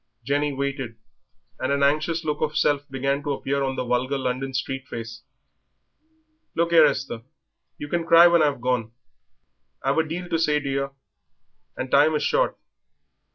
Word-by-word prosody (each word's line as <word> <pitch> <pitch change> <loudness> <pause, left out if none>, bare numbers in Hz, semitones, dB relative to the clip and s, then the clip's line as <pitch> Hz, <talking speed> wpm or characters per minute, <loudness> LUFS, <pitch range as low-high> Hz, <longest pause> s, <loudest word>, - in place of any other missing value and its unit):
Jenny 145 +3 0
waited, 135 -3 -3 0.6
and - - -1
an 140 0 +1
anxious 155 +3 +1
look 150 -1 -2
of 155 -1 -1
self 145 0 +1
began 135 +1 -1
to 145 -1 -2
appear 140 +1 -2
on 135 -1 -1
the 125 - -3
vulgar 125 +3 0
London 130 +1 -2
street 135 0 -4
face. 115 -1 -7 1.3
"Look 170 +1 +1
'ere, 160 -2 +8
Esther, 135 -5 -3 0.6
you 145 - -6
can 170 +2 -2
cry 170 0 +8
when 170 -1 +5
I've 145 -5 +1
gone; 125 -3 -1 0.9
I've 140 +4 +1
a - - +3
deal 170 +3 -5
to 165 - 0
say 150 -2 +2
to 145 - -6
yer 140 0 -1 0.9
and 130 - -4
time 150 +3 +5
is 150 - 0
short." - - +1
140 Hz, 165 wpm, -24 LUFS, 135-155 Hz, 1.3 s, ere